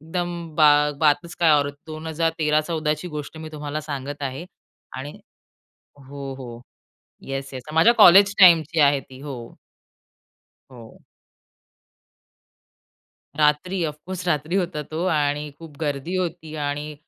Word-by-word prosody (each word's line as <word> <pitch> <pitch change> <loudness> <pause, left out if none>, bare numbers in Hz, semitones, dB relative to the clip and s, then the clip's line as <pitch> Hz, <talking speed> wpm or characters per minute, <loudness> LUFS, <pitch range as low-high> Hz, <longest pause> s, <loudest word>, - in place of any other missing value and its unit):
एकदम 170 0 -5
बा 155 -1 +6 0.3
बातच 160 +3 +2
काय 165 -2 +5
औरच. 145 0 -2
2013-14ची 155 0 -1
गोष्ट 150 -1 -7
मी 160 0 -7
तुम्हाला 150 0 -5
सांगत 145 -1 -6
आहे. 135 +4 -4 0.5
आणि 140 +3 -7 0.9
हो, 140 -1 -7
हो. 120 -3 -9 0.7
Yes, 135 0 -5
yes. 130 -1 -7
माझ्या 165 +9 +6
कॉलेज 195 +3 +8
टाईमची 165 -4 +6
आहे 140 -1 +4
ती 130 0 -15
हो. 145 -1 -6 1.4
हो. 115 -3 -14 2.3
रात्री, 155 +5 +1
ऑफकोर्स 165 +4 -6
रात्री 160 +3 0
होता 175 -5 -2
तो. 160 +3 -3
आणि 150 -2 0
खूप 160 -3 -12
गर्दी 150 +3 -2
होती 170 -3 -4
आणि 145 +1 -4
150 Hz, 115 wpm, -23 LUFS, 145-165 Hz, 2.3 s, कॉलेज